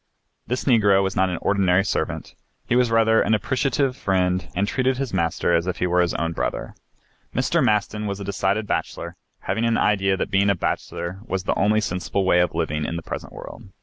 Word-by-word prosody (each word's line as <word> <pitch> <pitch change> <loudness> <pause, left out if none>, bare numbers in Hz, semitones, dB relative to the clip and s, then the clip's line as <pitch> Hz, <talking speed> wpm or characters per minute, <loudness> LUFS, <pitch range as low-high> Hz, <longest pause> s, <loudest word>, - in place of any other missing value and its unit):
This 125 +2 -2
Negro 105 -6 +4
was 95 - -2
not 95 -1 +2
an 90 - -2
ordinary 95 -2 +2
servant; - - -3 0.3
he 120 - +1
was 125 -1 +3
rather 115 0 +4
an 110 - +2
appreciative 130 +4 0
friend 90 -5 0
and 100 +3 +1
treated 130 +2 0
his 135 -4 -3
master 85 -1 0
as 85 +2 0
if 90 - -2
he - - 0
were 90 0 +2
his 85 - 0
own 85 0 -1
brother. 60 -5 -3 0.6
Mr. - - +2
Maston 105 0 0
was 100 0 -4
a - - -5
decided 100 +2 -1
bachelor, - - -3 0.3
having 110 +4 -2
an 115 -1 +2
idea 95 -2 +2
that 100 - -3
being 100 +1 +3
a 100 - +3
bachelor 90 +1 -3
was 95 -5 -2
the - - 0
only 105 +2 +2
sensible 95 0 -2
way 90 -1 +4
of 90 - +1
living 75 +1 -1
in 80 - -3
the 85 - -5
present - - -6
world. 115 - -10
100 Hz, 210 wpm, -23 LUFS, 90-110 Hz, 0.6 s, Negro